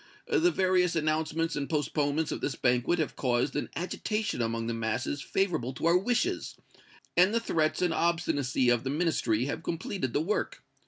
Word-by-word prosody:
The 375 -7 +3
various 185 - +2
announcements 160 +1 0
and 140 -1 -3
postponements 150 0 0
of - - -4
this 135 - -2
banquet 125 +8 +2
have 155 -3 -2
caused 125 +1 0
an 145 - -2
agitation 210 - -2
among 115 0 -1
the 115 - -2
masses 115 +5 -2
favorable 165 -11 -1
to 125 - -4
our 170 +1 +5
wishes, 245 - -1 0.6
and 185 +5 +5
the - - +4
threats 160 -6 0
and 175 -2 +2
obstinacy 145 -7 +1
of 120 -1 +2
the 135 - -2
Ministry 135 -7 +1
have 145 +3 -3
completed 165 - -3
the 145 - +2
work. 195 +7 -2
155 Hz, 170 wpm, -29 LUFS, 130-180 Hz, 0.6 s, our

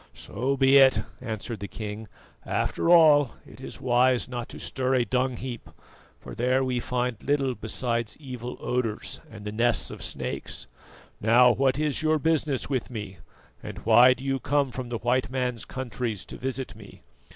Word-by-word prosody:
"So 130 +6 -2
be 135 +1 +6
it," 130 -6 +5 0.2
answered 110 -2 -5
the 100 - -5
king; 105 0 -6 0.4
"after - - -1
all, 150 -6 +6
it - - -14
is - - -8
wise 125 0 +2
not 120 -2 -5
to - - -9
stir 130 0 -1
a 125 -2 +2
dung 130 0 0
heap, 120 -3 -7 0.5
for - - -10
there 130 +2 +1
we 125 -1 -1
find 125 -2 -2
little 140 -2 +1
beside 115 0 -3
evil 125 -4 -7
odours 120 -4 -2
and 105 -2 -11
the 105 - -3
nests 115 0 +1
of - - -9
snakes. - - -5 0.5
Now, 120 +3 +6
what 135 +2 +1
is 150 -1 0
your 155 0 +2
business 155 -3 0
with 130 -4 -2
me, 105 -6 -7 0.4
and - - -8
why 125 +1 +7
do 130 - -11
you 135 -1 -1
come 140 -1 +1
from 125 -1 -6
the 120 - -2
white 125 +3 0
man's 125 -3 -2
countries 120 -5 -4
to - - -9
visit 130 -4 -4
me? 105 -2 -14
125 Hz, 175 wpm, -26 LUFS, 115-135 Hz, 0.5 s, why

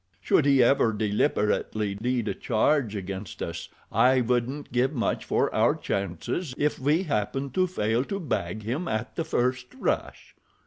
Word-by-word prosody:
Should 135 - +2
he 135 -3 +6
ever 120 -2 +3
deliberately 105 0 0
lead 120 -1 0
a - - 0
charge 120 -1 +1
against 95 0 -5
us 85 0 -5 0.2
I 130 +1 +4
wouldn't 125 +4 -1
give 125 +4 +1
much 120 -5 -1
for - - +1
our - - +3
chances 100 - -3
if 150 +1 0
we 150 +7 +2
happened 135 - -2
to 185 +2 +2
fail 115 -8 0
to 195 +5 -3
bag 105 - -3
him 135 +11 -2
at 110 +2 -3
the 165 - -1
first 125 -4 0
rush." - - -3
125 Hz, 160 wpm, -26 LUFS, 105-140 Hz, 0.2 s, he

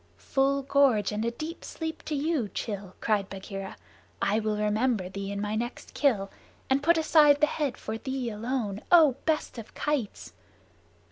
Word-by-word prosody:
"Full 275 0 +1
gorge 270 -7 +3
and 210 +1 -2
a 230 - +1
deep 310 +8 -7
sleep 320 -1 -5
to 305 - -2
you, 285 -6 0 0.2
Rann," 200 -3 -5
cried 205 -3 +1
Bagheera. 195 0 -7 0.4
"I 210 +2 +2
will 215 -1 -1
remember 210 -1 +1
thee 200 +1 -5
in 200 - -3
my 210 +1 -2
next 240 +3 -5
kill, 210 -9 +1 0.4
and 270 +1 +3
put 335 +3 +4
aside 300 -2 +5
the 300 - +6
head 295 -3 -2
for 220 +1 -5
thee 260 -3 -3
alone, 215 -2 -3
O 310 -7 +7
best 305 -6 0
of 220 - -11
kites!" 290 -8 -2
235 Hz, 165 wpm, -28 LUFS, 210-285 Hz, 0.4 s, O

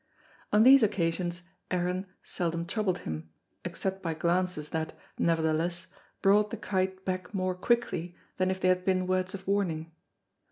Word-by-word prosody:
On 210 +1 +6
these 270 +2 +9
occasions 175 -3 0 0.3
Aaron 180 +1 -1 0.2
seldom 170 -2 -2
troubled 190 -2 0
him, 80 0 -5 0.3
except 190 0 -3
by 165 -3 -2
glances 170 -1 0
that, 160 -1 -2 0.3
nevertheless, 165 +1 +1 0.4
brought 205 +2 +5
the - - -5
kite 190 -1 -1
back 185 +1 -3
more 185 -1 0
quickly 180 -4 0 0.2
than 185 0 +2
if 190 0 -1
they 185 - +3
had 185 0 +2
been 185 -1 +2
words 185 +1 0
of 190 0 -9
warning. 170 -5 0
185 Hz, 150 wpm, -29 LUFS, 170-190 Hz, 0.4 s, these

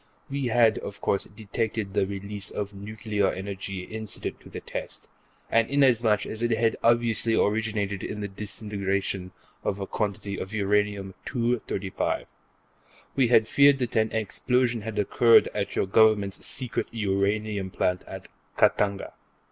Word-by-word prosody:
We 140 -2 -1
had, 115 -2 +4
of 100 - -7
course, 100 - 0
detected 110 -1 -3
the 95 - +2
release 100 +1 -6
of 105 0 -4
nuclear 105 0 -2
energy 95 -1 -5
incident 110 +2 -5
to - - -14
the - - -6
test, - - -7 0.4
and 115 0 +2
inasmuch 120 -6 +3
as 110 - -5
it 120 - +1
had 115 0 +2
obviously 115 -1 +3
originated 105 -2 0
in 105 - -4
the 100 - -3
disintegration 100 -2 -3 0.3
of 100 - -1
a 100 - -3
quantity 100 -1 -3
of 95 +3 -5
Uranium 100 -1 0
235, 115 -6 -1 0.9
we 130 -3 +4
had 110 -2 +5
feared 140 +2 +6
that 125 -3 -3
an 110 0 +2
explosion 120 +2 0
had 110 0 -6
occurred 115 +3 +5
at 100 -1 -2
your - - +1
Government's 100 -1 +3
secret 130 -4 -3
uranium 100 -1 0
plant 90 0 0
at - - -8 0.3
Khatanga. 100 -1 +2
105 Hz, 140 wpm, -26 LUFS, 100-115 Hz, 0.9 s, feared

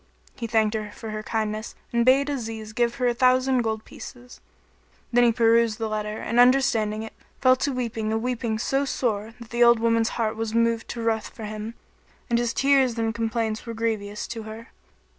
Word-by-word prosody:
He 230 - -5
thanked 220 -1 +2
her 215 -1 -3
for 220 +1 -8
her 215 0 -4
kindness 215 0 -3 0.2
and 235 0 +3
bade 265 +3 +4
Aziz 225 -6 -5
give 240 +1 +1
her 255 - -1
a 240 - +2
thousand 255 +1 +3
gold 220 -1 -3
pieces: 250 0 -11 0.7
then 245 0 +5
he 240 - +5
perused 230 -1 +3
the 225 -2 -2
letter 215 0 -3
and 235 +2 -1
understanding 245 -4 +3
it 225 - -9 0.3
fell 255 -1 +5
to 280 +2 -1
weeping 230 -4 -2
a 220 - +1
weeping 235 -1 -2
so 270 +5 0
sore 225 -5 -2
that 235 -2 -12
the 240 0 +3
old 235 0 +7
woman's 230 0 +2
heart 225 -2 0
was 225 0 -3
moved 230 0 +1
to 235 - -5
ruth 220 -1 0
for 225 - -11
him, 215 +2 -6 0.6
and 235 - +3
his 240 -1 0
tears 270 -3 +3
and 225 -1 0
complaints 225 0 -2
were 230 - -5
grievous 215 -2 -2
to 230 -1 -5
her. 220 +1 -9
230 Hz, 200 wpm, -25 LUFS, 220-240 Hz, 0.7 s, old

